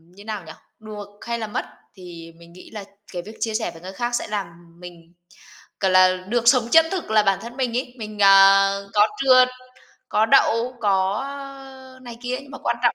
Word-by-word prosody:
như 200 - -14
nào 215 -3 -5
nhỉ, 160 - -10 0.3
được 210 -2 -9
hay 235 0 -4
là 220 - -4
mất 210 - -4 0.3
thì 170 -3 -11
mình 170 0 -17
nghĩ 180 - -14
là 210 -2 -7 0.3
cái 175 - -4
việc 215 +5 -12
chia 225 - -2
sẻ 220 -5 -2
với 165 -1 -15
người 185 +2 -9
khác 240 +2 -3
sẽ - - -3
làm 205 -3 -3 0.3
mình 175 -1 -13 0.7
c - - -14
là 185 0 +5
được 235 0 0
sống 245 -3 +2
chân 325 +3 +6
thực 370 - -4
là 215 -1 +4
bản 195 -1 +1
thân 235 +3 -10
mình 245 -3 -1
ấy, 250 -1 -4
mình, 215 -2 -8
à, 195 0 +7 0.2
có 210 0 +4
trượt, 255 -1 +5 0.6
có 215 +1 +2
đậu, 230 +3 +2
có 195 +2 0 0.8
này 240 -2 -10
kia 250 +1 -3
nhưng 275 - -16
mà 280 - -9
quan 235 - -2
trọng 240 - +3
215 Hz, 210 wpm, -22 LUFS, 190-240 Hz, 0.8 s, à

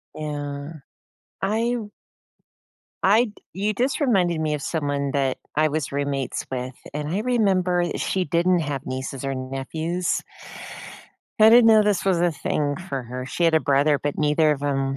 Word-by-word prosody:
Yeah. 145 0 -5 0.7
I 225 +5 0 1.3
I 215 +5 +5
d 210 - -10 0.2
you 205 +3 -1
just 255 +8 0
reminded 185 - +2
me 155 -1 0
of 150 - -3
someone 145 -3 -2
that 135 -2 0 0.2
I 155 +1 +3
was 155 -1 -2
roommates 140 -2 -2
with, 130 0 -4 0.2
and 150 0 -3
I 190 +5 -1
remember 195 -7 +2
i 175 - -2
she 190 -1 0
didn't 175 +1 +2
have 145 -4 -3
nieces 130 +1 -5
or 135 -1 -2
nephews. 155 +7 -2 1.2
I 215 - +9
didn't 235 0 +7
know 220 -1 +7
this 205 -3 +1
was 185 -3 +2
a 175 -1 +3
thing 145 -1 -2
for 135 -5 -3
her. 125 +2 -6
She 170 +6 -1
had 165 - +4
a 160 - +4
brother, 140 +1 +3
but 145 -1 -3
neither 150 +1 +3
of 145 -1 -5
'em 135 -1 -1
155 Hz, 170 wpm, -23 LUFS, 140-185 Hz, 1.3 s, I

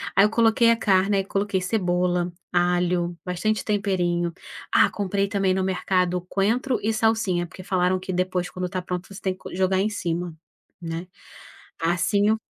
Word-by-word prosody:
Aí 195 - +7
eu - - +2
coloquei 230 +1 +4
a 230 - +5
carne, 195 -2 +2
e - - +3
aí 195 - -2
coloquei 195 -1 -1
cebola, 180 -2 0 0.2
alho, 175 0 +1
bastante 200 +4 -1
temperinho. 180 -5 0 0.4
Ah, - - +6
comprei 200 0 -1
também 195 -2 +1
no 190 0 0
mercado 180 -1 +1
coentro 235 +7 +1
e 220 - +2
salsinha, 220 -6 +1
porque 185 +3 -11
falaram 185 0 +1
que 185 +1 -5
depois, 185 0 -1
quando 185 0 -4
está 180 +1 -3
pronto, 180 0 -5
você 195 - -10
tem 190 - 0
que 185 - -19
co - - -8
jogar 190 0 +2
em 205 +3 +1
cima, 175 -4 -3 0.5
né? 165 +1 -5 0.8
Assim 180 +5 +2
eu 220 - +2
185 Hz, 175 wpm, -24 LUFS, 180-200 Hz, 0.8 s, Aí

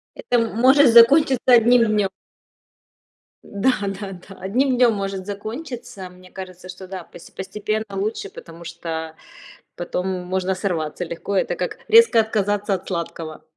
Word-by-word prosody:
Это 245 - 0
может 250 +4 +4
закончиться 255 +3 +6
одним 240 -1 +6
днём. 210 -3 +1 1.3
Да, 210 +6 0 0.2
да, 195 0 -6
да, 185 +1 -12
одним 250 +8 +1
днём 245 -2 +5
может 195 -2 -4
закончиться. 230 - -7
Мне 180 0 -17
кажется, 185 -1 -10
что 185 0 -10
да, 185 -2 -7
посте 170 - -15
постепенно 210 +3 -3
лучше, 195 +1 -3
потому 170 0 -12
что 165 -1 -6 0.6
потом 180 +1 -3 0.2
можно 185 +1 -1
сорваться 175 -4 -3
легко, 170 +4 -5
это 190 - 0
как - - -4
резко 455 - +6
отказаться 205 -1 -1
от 185 - -4
сладкого. 165 -3 -5
195 Hz, 135 wpm, -21 LUFS, 185-230 Hz, 1.3 s, закончиться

